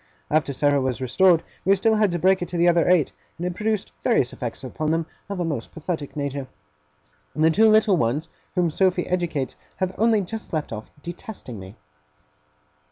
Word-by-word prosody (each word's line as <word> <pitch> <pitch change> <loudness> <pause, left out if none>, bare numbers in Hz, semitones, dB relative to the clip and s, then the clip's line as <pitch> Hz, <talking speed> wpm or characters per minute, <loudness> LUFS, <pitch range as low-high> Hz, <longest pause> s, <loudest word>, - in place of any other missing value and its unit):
After 150 -2 +2
Sarah 145 +1 +2
was 130 -2 -1
restored, 165 +7 +4 0.2
we 195 +2 +5
still 220 +3 +2
had 215 -2 +3
to 175 - -1
break 185 +2 +3
it 175 - -2
to 175 - -4
the 170 +1 +4
other 170 0 +4
eight; 175 -5 +3 0.2
and 175 - -4
it 180 - -1
produced 215 +1 -1
various 180 - +2
effects 120 +1 -5
upon 150 +4 -3
them 165 +1 +1 0.2
of 200 -2 -4
a 175 - 0
most 145 -8 -3
pathetic 160 -3 -5
nature. 140 -2 -3 0.9
The 155 +2 +4
two 220 +7 +5
little 215 -3 +5
ones, 140 +6 0 0.3
whom 175 -2 +2
Sophy 185 +1 +2
educates, 170 -7 -1 0.2
have 185 0 -2
only 225 -1 +4
just 220 +2 -6
left 155 -6 -2
off 110 0 -7
de 175 - -4
testing 180 - -8
me. 95 +2 -10
170 Hz, 190 wpm, -24 LUFS, 145-190 Hz, 0.9 s, we